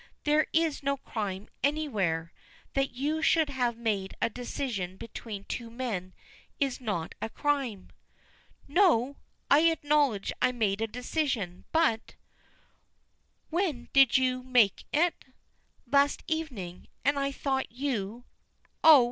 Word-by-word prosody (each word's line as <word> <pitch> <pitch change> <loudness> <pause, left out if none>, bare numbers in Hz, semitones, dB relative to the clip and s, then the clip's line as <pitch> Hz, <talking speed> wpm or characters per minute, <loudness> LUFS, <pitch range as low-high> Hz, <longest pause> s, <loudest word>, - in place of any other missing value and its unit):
"There 300 +1 +3
is 325 -2 +1
no 280 0 0
crime 205 -6 -4
anywhere. 210 - 0 0.4
That 275 0 +1
you 295 +6 -2
should 320 -2 +3
have 245 -3 0
made 205 -5 -2
a 230 - +1
decision 225 -6 -4
between 210 -2 -7
two 235 +2 -5
men 225 -7 -4 0.4
is 270 -2 0
not 200 -9 -2
a 225 - -2
crime." 270 -8 -1 0.8
"No! 285 - +3 0.3
I 285 - +8
acknowledge 290 -9 +1
I 250 - +3
made 215 -4 0
a 225 - +1
decision 245 - -2
but 315 -9 +1 0.7
" - - -45
"When 325 -8 -1
did 270 -3 +6
you 255 -1 +1
make 250 -5 +3
it?" 335 +3 +1 0.6
"Last 280 +3 +3
evening 250 - -4 0.2
and 285 - +4 0.2
though 265 -1 0
you 240 -3 -3 0.3
" - - -39
"Oh! 315 -3 +10
255 Hz, 125 wpm, -29 LUFS, 215-285 Hz, 0.8 s, Oh